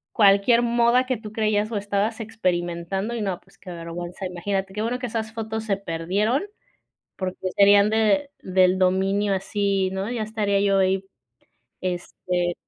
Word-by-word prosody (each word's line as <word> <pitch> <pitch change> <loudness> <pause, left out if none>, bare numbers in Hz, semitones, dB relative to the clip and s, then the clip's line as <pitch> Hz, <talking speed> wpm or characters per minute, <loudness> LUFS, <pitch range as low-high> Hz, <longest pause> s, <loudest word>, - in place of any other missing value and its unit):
cualquier 205 +3 +5
moda 240 +1 +3
que 255 -1 -1
tú 210 -1 -9
creías 215 0 0
o 215 - -1
estabas 205 +3 -1
experimentando. 190 -1 -2
Y 230 - -3
no, 190 -3 -2
pues, - - -25
qué 185 - -12
vergüenza. 175 +2 -6
Imagínate, 190 +2 -3
qué 210 - -3
bueno 245 +3 -1
que 250 - -3
esas 220 -1 -3
fotos 220 -1 -4
se 205 -3 0
perdieron, 200 - -1 0.7
porque 185 -1 -3 0.2
serían 200 +1 +6
de, 225 +7 +2
del 185 0 +3
dominio 195 +2 +2
así, 195 0 0
¿no?, 190 +4 -3
ya 235 -3 -2
estaría 210 -2 0
yo 200 -1 +3
ahí. 190 0 +2 0.8
Este 180 -1 -2
200 Hz, 155 wpm, -24 LUFS, 185-220 Hz, 0.8 s, serían